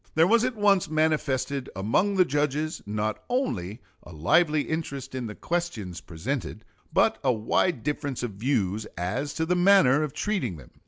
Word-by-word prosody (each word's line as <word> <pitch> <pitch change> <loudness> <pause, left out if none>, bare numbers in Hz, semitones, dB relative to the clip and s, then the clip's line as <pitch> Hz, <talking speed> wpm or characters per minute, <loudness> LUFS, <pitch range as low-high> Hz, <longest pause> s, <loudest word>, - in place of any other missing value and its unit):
There 160 +1 +6
was 225 +5 +4
at 255 -1 -1
once 200 -5 +3
manifested 145 -4 0
among 115 - +1
the 185 -1 +5
judges 150 +1 -1
not 105 +1 -2
only 115 - -2 0.2
a - - -13
lively 150 - +3
interest 140 -5 -4
in 130 -3 -3
the 105 - -7
questions 160 - -3
presented, 110 - -5 0.3
but - - +3
a 130 - +4
wide 115 +5 0
difference 140 -3 -3
of 120 - -2
views 105 -2 -1
as 120 +12 -2
to 160 - 0
the 180 +2 +1
manner 175 -7 +5
of 150 -3 -2
treating 165 - -2
them. 70 - -14
140 Hz, 165 wpm, -26 LUFS, 110-165 Hz, 0.3 s, There